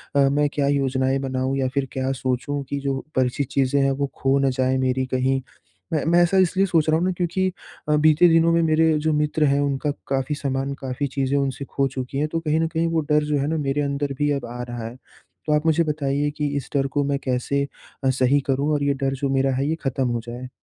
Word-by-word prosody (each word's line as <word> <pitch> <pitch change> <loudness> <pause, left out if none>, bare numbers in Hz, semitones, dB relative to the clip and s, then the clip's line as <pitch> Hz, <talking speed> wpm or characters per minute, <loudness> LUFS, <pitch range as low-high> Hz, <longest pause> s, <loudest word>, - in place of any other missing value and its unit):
अ, - - +4
मैं 145 +1 +2
क्या 140 -1 0
योजनाएँ 135 -1 +1
बनाऊँ 130 +1 -1
या 130 -1 +1
फिर 140 -1 0
क्या 130 0 -1
सोचूँ 135 +2 -2
कि 140 - -2
जो 135 -1 -2 0.2
परिचित 130 +2 0
चीज़ें 140 +1 +2
हैं 135 - +2
वो 140 +1 -1
खो 135 +1 +1
ना 135 -1 +2
जाए 130 0 +2
मेरी 130 +1 0
कहीं। 130 +1 +1 0.5
मैं 155 - +1
मैं 170 +1 +4
ऐसा 190 +3 +2
इसलिए 190 +1 +3
सोच 160 -3 +2
रहा 155 - +4
हूँ 175 - 0
ना 185 - +1
क्योंकि 185 +1 0 0.4
अ, 150 - +4
बीते 155 +3 +5
दिनों 165 0 +4
में 170 - +3
मेरे 160 0 +3
जो 155 0 0
मित्र 150 +1 +1
हैं 140 - +2
उनका 140 +1 0 0.2
काफ़ी 135 +2 -1
सामान, 135 -1 -2
काफ़ी 135 +1 -3
चीज़ें 135 +1 -1
उनसे 140 0 -2
खो 135 0 0
चुकी 130 0 -5
हैं। 150 - +1
तो 165 - 0
कहीं 160 -1 0
न 165 - +1
कहीं 165 +1 -1
वो 160 -1 +1
डर 150 0 +4
जो 150 -1 0
है 140 - -1
ना 160 +1 -1
मेरे 145 0 -1
अंदर 140 0 -2
भी 145 0 +2
अब 140 -4 -2
आ 120 +1 -7
रहा 120 -1 -5
है। 120 - -9 0.5
तो 150 - +2
आप 150 +1 +1
मुझे 160 +1 +3
बताइए 145 -2 -1
कि 150 - 0
इस 135 - -5
डर 135 -1 +2
को 145 - +3
मैं 140 0 -1
कैसे 130 +2 0 0.4
अ, 135 - +3
सही 130 +2 +3
करूँ? 140 +3 +1
और 145 - 0
ये 140 0 +2
डर 135 0 +1
जो 135 - +2
मेरा 135 0 +1
है 135 +2 0
ये 160 - +1
ख़त्म 130 -1 0
हो 120 -1 -1
जाए? 125 +2 -7
140 Hz, 245 wpm, -23 LUFS, 135-150 Hz, 0.5 s, बीते